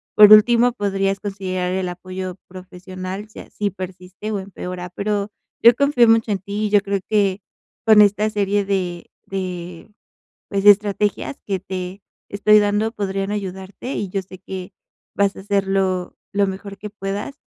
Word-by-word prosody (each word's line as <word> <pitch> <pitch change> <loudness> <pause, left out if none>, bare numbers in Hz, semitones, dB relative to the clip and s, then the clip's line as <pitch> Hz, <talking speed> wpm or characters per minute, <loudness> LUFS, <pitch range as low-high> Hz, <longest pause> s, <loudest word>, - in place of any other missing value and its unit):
por 210 0 +9
último 235 +3 +6
podrías 195 -2 -1
considerar 185 -3 -3
el 190 -1 -1
apoyo 185 +1 -6
profesional, 185 +2 -8
si - - -17
así 205 -1 -3
persiste 185 +3 -7
o 205 - -1
empeora, 180 -2 -7
pero 205 +3 -2 0.3
yo 235 0 +8
confío 280 -4 +4
mucho 225 -1 +3
en 200 - 0
ti. 205 +3 -3
Yo 205 -1 +5
creo 200 -1 -2
que 200 -2 +1 0.4
con 215 -1 +7
esta 205 +1 +3
serie 205 -1 0
de 180 -3 -2 0.2
de, 180 0 -6 0.6
pues, 195 -1 -1
estrategias 205 +4 +3
que 195 -2 -1
te 185 +1 -6 0.3
estoy 210 +1 +5
dando, 205 +2 +1
podrían 195 -2 -2
ayudarte, 195 +4 -5
y 205 - -2
yo 195 +1 -2
sé 185 0 -13
que 185 0 -7 0.4
vas 200 -1 +2
a - - -9
hacerlo 195 -2 0 0.2
lo 200 -1 +2
mejor 195 +1 -6
que 210 +2 -7
puedas, 205 +6 -5
195 Hz, 155 wpm, -21 LUFS, 185-210 Hz, 0.6 s, por